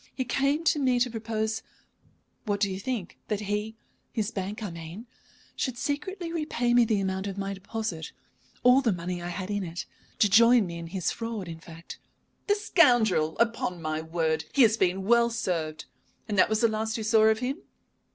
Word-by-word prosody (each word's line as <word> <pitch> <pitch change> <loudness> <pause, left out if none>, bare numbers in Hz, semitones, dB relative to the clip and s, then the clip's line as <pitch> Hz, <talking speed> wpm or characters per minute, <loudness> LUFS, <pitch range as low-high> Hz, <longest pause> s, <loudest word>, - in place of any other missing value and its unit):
He 260 - -2
came 275 +5 +1
to 315 - +3
me 255 -3 +2
to 245 0 +1
propose 220 -1 -2 0.8
what 205 -2 -1
do 200 -1 +1
you 190 - -4
think? 215 -4 -4
that 210 -1 -2
he 210 +2 -3 0.4
his 220 -2 -2
bank, 200 +2 -4
I 200 - -4
mean 170 +6 -8 0.5
should 255 -3 -2
secretly 340 +6 -3
repay 250 -7 0
me 240 -1 +6
the 215 -2 +1
amount 190 0 -2
of 195 -1 -5
my 195 0 -3
deposit, 195 -4 -5 0.5
all 250 +2 +6
the 235 -5 +2
money 175 0 -4
I 175 - -5
had 185 +3 -4
in 205 -1 -1
it. 170 0 -5 0.3
To 210 - +5
join 230 +2 +6
me 170 -1 -6
in 170 - -7
his 180 0 -2
fraud, 230 -5 -5
in 165 -1 -7
fact 165 0 -11 0.2
" - - -44
"The 410 - +4
scoundrel! 240 - +3
Upon 230 -6 0
my 155 -1 -2
word, 160 -1 -1
he 275 - +6
has 220 -1 +5
been 190 -2 +1
well 235 +3 +4
served. 165 -9 -3 0.4
And 210 - -2
that 190 - +5
was 220 0 +1
the 230 - +5
last 220 0 -2
you 220 - -4
saw 220 0 +4
of 220 0 +4
him?" 260 +7 -3
215 Hz, 200 wpm, -27 LUFS, 180-235 Hz, 0.8 s, me